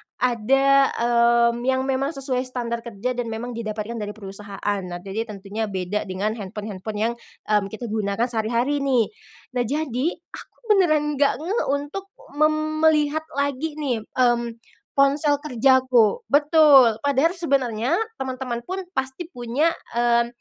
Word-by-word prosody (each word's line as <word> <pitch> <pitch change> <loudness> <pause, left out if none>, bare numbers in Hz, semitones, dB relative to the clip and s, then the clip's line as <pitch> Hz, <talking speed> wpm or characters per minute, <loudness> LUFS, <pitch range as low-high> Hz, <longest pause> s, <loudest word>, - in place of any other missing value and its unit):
ada, 270 +3 +3
mmm, 235 0 +3
yang 260 0 +2
memang 270 +3 -1
sesuai 265 -2 0
standar 235 -2 -3
kerja 235 +1 -4
dan 245 -2 -3
memang 225 +2 -5
didapatkan 225 0 -4
dari 210 0 -5
perusahaan. 200 0 -4
Nah, 175 0 -6
jadi 220 +4 -4
tentunya 210 +2 -5
beda 190 +1 -3
dengan 195 +3 -2
handphone-handphone 205 +1 -6
yang, 235 +1 +1 0.4
mmm, 205 -2 +3
kita 220 +4 -9
gunakan 215 +2 0
sehari-hari 235 +6 0
nih. 260 - +1 0.5
Nah, - - +3
jadi 285 -1 -1 0.2
aku - - -11 0.2
benaran 325 -7 +4 0.2
enggak 285 - +3
ngeh 400 +7 -1
untuk 290 +8 -3 0.3
mem 310 0 +1
melihat 310 0 +2
lagi 285 +2 -1
nih, 250 -8 -3
mmm, 240 -2 +2 0.4
ponsel 285 +1 +3
kerjaku 260 - +3
betul, 285 -6 +6
padahal 285 +5 +2
sebenarnya 265 - 0 0.2
teman-teman 255 -2 -3
pun 380 +1 -3
pasti 265 +4 -4
punya, 250 +7 0 0.2
mmm, 235 0 +3
245 Hz, 135 wpm, -23 LUFS, 220-285 Hz, 0.5 s, betul